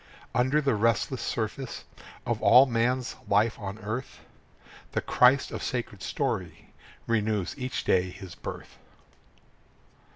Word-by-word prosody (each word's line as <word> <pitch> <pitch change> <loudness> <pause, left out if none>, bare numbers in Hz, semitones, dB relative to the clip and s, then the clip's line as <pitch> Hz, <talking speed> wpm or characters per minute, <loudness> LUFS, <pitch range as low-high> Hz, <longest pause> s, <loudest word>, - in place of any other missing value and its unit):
Under 130 +6 +2
the 140 -3 +2
restless 115 +3 +1
surface 115 +4 -3 0.4
Of - - -1
all 125 +3 +8
man's 125 +1 0
life 105 +3 +2
on 100 -1 -5
earth, 115 +5 -5 0.7
The - - 0
Christ 130 +2 +4
of - - -5
sacred 115 -6 -4
story - - -3 0.3
Renews 110 -4 0
each 130 -2 -3
day 90 0 +2
his 95 -1 -10
birth. - - -8
115 Hz, 120 wpm, -28 LUFS, 105-125 Hz, 0.7 s, all